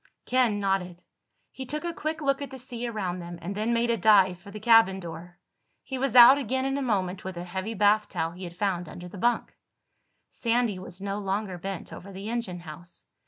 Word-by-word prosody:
Ken 245 -5 +2
nodded. 185 -3 -1 0.5
He 265 - -7
took 300 +5 -3
a 340 - -2
quick 315 0 -3
look 275 -1 +1
at 280 - -4
the 265 - -8
sea 245 -2 -5
around 190 -6 -3
them 175 0 -7
and 175 +4 -5
then 215 +3 -1
made 235 0 +2
a 230 - +1
dive 190 -3 +5
for 195 +3 -13
the 210 +1 -8
cabin 225 -4 +5
door. 175 0 -9 0.5
He 265 -1 -5
was 265 -2 -1
out 250 +3 +10
again 260 0 -1
in 270 0 0
a 280 - -1
moment 190 -7 -1
with 190 -2 -6
a 175 - -4
heavy 190 +5 -4
bath 210 +1 +3
towel 165 -3 -2
he 180 +2 -8
had 170 0 -9
found 180 -4 -1
under 180 0 -9
the 185 +2 -10
bunk. 240 +4 0 0.8
Sandy 230 -4 0
was 185 0 -9
no 200 +1 -3
longer 195 -2 -2
bent 195 0 -6
over 200 - -10
the 195 +3 -6
engine 200 -7 -3
house. 170 +2 -9
200 Hz, 215 wpm, -27 LUFS, 180-240 Hz, 0.8 s, out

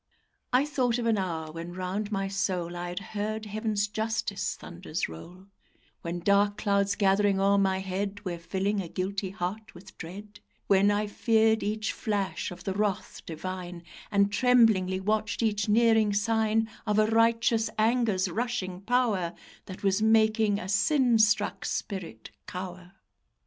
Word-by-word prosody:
I 255 +3 +4
thought 255 -5 0
of 240 - -2
an 225 -3 +2
hour 165 -4 -3
when 165 +2 -7
round 190 +4 -3
my 195 -1 -1
soul 185 -3 -2
I 175 0 -4
had 175 - -4
heard 215 +1 -3
heaven's 210 0 -1
justice 220 +2 -2
thunders - - -5
roll; 175 - -11 0.6
When 170 0 -4
dark 205 +2 +3
clouds 200 -1 +1
gathering 200 0 +2
o'er 200 +1 +3
my 190 -1 +1
head 200 +2 -4
Were 175 -2 -3
filling 195 +4 -1
a 180 - -6
guilty 190 +2 -3
heart 195 +3 -5
with 190 +2 -14
dread; 200 +5 -9 0.3
When 200 +1 +4
I 205 +1 +1
feared 220 +1 +2
each 215 +1 -2
flash 205 -4 -2
of 180 0 -10
the 195 - -2
wrath 205 -1 -2
divine, 175 +1 -6 0.3
And 200 0 +2
tremblingly 220 -6 +3
watched 215 +3 -1
each 210 -1 0
nearing 220 -1 +4
sign 220 +1 +1 0.2
Of 210 0 +1
a 215 - +5
righteous 230 0 +2
anger's 220 -4 +2
rushing 190 -3 -3
power 205 -6 0 0.3
That 185 +1 -9
was 195 +1 +2
making 220 -1 +3
a 185 - -6
sin 235 +4 +3
struck 220 0 +2
spirit 170 - -5 0.2
cower. 180 0 -7
205 Hz, 150 wpm, -28 LUFS, 185-220 Hz, 0.6 s, a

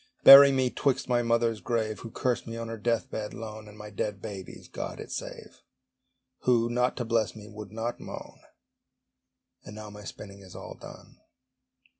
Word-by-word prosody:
Bury 140 0 +12
me 130 -2 +1
'twixt 135 -3 0
my 120 -1 +2
mother's 115 -1 +1
grave, 110 -3 -1
(Who 115 - -8
cursed 125 +2 -1
me 115 0 -5
on 115 0 -5
her 115 - -5
death 115 +1 0
bed 105 -1 -4
lone) 110 -1 -8
And 105 0 -13
my 105 0 -9
dead 105 0 -3
baby's 95 -2 -8
(God - - -6
it - - -8
save!) - - -7 0.8
Who, 120 -2 +2
not 125 +1 +1
to 120 - -2
bless 115 -2 0
me, 105 -1 -10
would 105 -2 -9
not 115 +2 -4
moan. - - -9 1.2
And 105 - -10
now 105 -1 -8
my 105 0 -11
spinning 100 0 -9
is 95 -2 -13
all - - -8
done. - - -13
115 Hz, 180 wpm, -28 LUFS, 105-120 Hz, 1.2 s, Bury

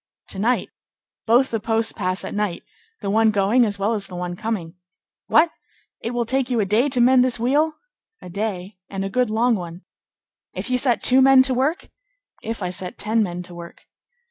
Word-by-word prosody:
"To 190 - -5
night. 240 +5 0 0.6
Both 245 +4 +4
the 225 - -1
posts 225 +1 0
pass 185 -2 -2
at - - -6
night; 205 -4 -2 0.4
the 200 - -3
one 220 +1 +4
going 210 +4 +3
as 205 -2 -2
well 200 +3 0
as 205 -3 -1
the 180 - -9
one 175 0 -4
coming." 190 -5 -4 0.5
"What! 320 +1 +4 0.5
It 230 - -4
will 240 -1 -1
take 265 +2 0
you 245 -2 0
a 210 - +2
day 220 +8 +2
to 255 -2 0
mend 250 +1 +5
this 250 -2 0
wheel?" 295 +6 +1 0.4
"A - - -11
day, 195 0 -4
and 195 0 -4
a 195 - -5
good 250 0 +1
long 230 +3 +2
one." 175 -3 -5 0.7
"If - - -5
you 250 - +2
set 245 -2 +1
two 260 +1 +5
men 265 0 +7
to 260 -1 +2
work?" 275 +8 -1 0.5
"If 225 -2 -5
I 180 - -2
set 180 0 -4
ten 220 +2 0
men 180 -3 -3
to 175 0 -10
work." 170 0 -11
220 Hz, 205 wpm, -22 LUFS, 195-250 Hz, 0.7 s, men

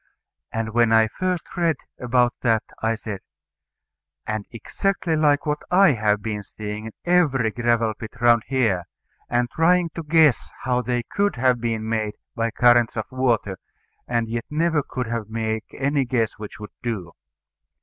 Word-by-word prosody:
And 115 0 -2
when 120 -1 +4
I 110 -1 +5
first 180 +4 -2
read 170 -3 +2 0.2
about 125 0 +2
that, 115 -3 +2 0.2
I 115 +1 +1
said, 105 -3 -6 1.1
"And 110 -1 -3
exactly 175 - -1
like 150 -1 +3
what 150 0 -1
I 190 -1 +6
have 105 -4 +1
been 105 -2 -3
seeing 105 +1 -7
in - - -7
every 145 -10 +3
gravel 115 -1 +1
pit 110 +1 -8
round 120 -1 +5
here, 115 -10 +1 0.4
and 120 0 +1
trying 170 +1 +3
to 165 - -5
guess 155 -4 +3
how 125 -1 +1
they 120 -1 -1
could 200 - 0
have 125 -1 +2
been 115 -2 -2
made 110 -2 -1 0.2
by 115 0 0
currents 120 0 +4
of 110 - -1
water, 120 -7 0 0.5
and 120 -1 0
yet 115 +1 -3
never 160 0 +1
could 125 -3 -4 0.2
make 110 -1 -2
any 140 0 0
guess 115 -3 -1
which 105 0 -8
would 105 -1 -8
do." 105 -8 -4
120 Hz, 160 wpm, -23 LUFS, 110-145 Hz, 1.1 s, I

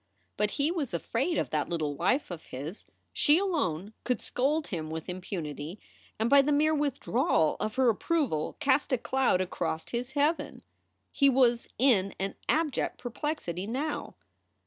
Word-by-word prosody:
But 210 0 +1
he 290 +3 +2
was 290 - -2
afraid 260 - -1
of - - -1
that 155 -1 0
little 155 -4 -1
wife 190 - +1
of 170 -2 -7
his. 145 +10 -7 0.3
She 295 +2 +4
alone 220 - -1
could 250 - 0
scold 295 +5 0
him 160 -4 -4
with 160 0 -5
impunity 180 -2 -5 0.4
and 220 - +1
by 280 +2 +7
the 285 +2 0
mere 305 +2 +3
withdrawal 275 - +1
of 215 0 -2
her 260 -1 +3
approval 235 - 0
cast 285 -1 +2
a 255 - +3
cloud 255 -6 +1
across 160 -3 -3
his 245 +2 -3
heaven. 300 +3 0 0.5
He 280 -1 +4
was 245 -3 +3
in 215 -7 +3
an 195 +1 -2 0.2
abject 310 -3 +1
perplexity 240 - -4
now. 285 +7 -3
245 Hz, 155 wpm, -29 LUFS, 180-290 Hz, 0.5 s, by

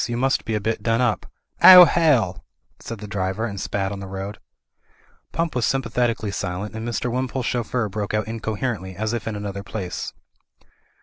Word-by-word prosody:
You 120 -1 -3
must 135 +2 +1
be 115 -2 -1
a - - +1
bit 110 +1 -2
done 115 +1 +1
up.*' 120 -4 0 0.3
*'Oh 180 -1 +12
hell 125 - +2 0.2
!" - - -42
said 115 - -7
the 105 0 -8
.driver 95 +2 -2
and 100 -5 -5
spat 95 -1 -2
on 100 - -5
the 100 - -7
road. 95 +2 -6 0.9
Pump 165 -1 -1
was 125 -3 +1
S3rmpafhetically 120 -5 0
silent, 95 +3 -4
and 110 +1 -5
Mr. 120 +1 -2
Wim 130 +1 -1
pole's 130 -1 -3
chauffeur 120 -1 -1
broke 105 +1 -3
out 105 0 -1
incoherently, 110 -3 -3
as 110 +4 -2
if 115 -2 -3
in 110 - -2
an 105 0 -5
other 100 -1 -4
place. 100 -2 -5
110 Hz, 195 wpm, -23 LUFS, 100-120 Hz, 0.9 s, Oh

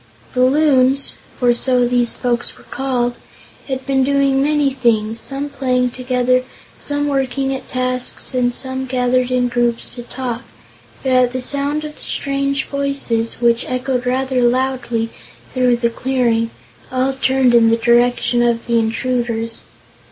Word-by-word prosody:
The 250 - +2
Loons 275 -1 +3 0.2
for 245 -1 +3
so 250 0 +2
these 245 -1 +3
folks 240 -1 -2
were - - -17
called 250 -2 -1 0.5
had 265 -1 -4
been 270 -1 +2
doing 275 0 +2
many 290 -1 +2
things, 225 -3 +1
some 275 +1 -4
playing 255 -3 0
together, 255 0 +1 0.4
some 290 0 -2
working 270 -1 -1
at 265 - -6
tasks 255 +1 -2
and 250 -1 +1
some 260 +1 -3
gathered 250 0 +1
in 250 -1 +1
groups 240 -1 -1
to 245 - -7
talk; 245 -1 -5 0.6
but 265 - 0
at 255 -1 +3
the 255 - -2
sound 285 +3 0
of 300 0 -9
strange 275 0 -1
voices, 275 -5 -2
which 235 0 +3
echoed 255 0 -2
rather 260 0 0
loudly 245 -2 0 0.4
through 250 -2 +3
the 235 0 0
clearing, 235 -3 0 0.4
all 260 +1 0
turned 265 -1 +2
in 230 -1 +6
the 230 - +3
direction 240 +1 +2
of 235 -1 +1
the 235 -1 +2
intruders. 230 0 -2
255 Hz, 145 wpm, -18 LUFS, 240-270 Hz, 0.6 s, in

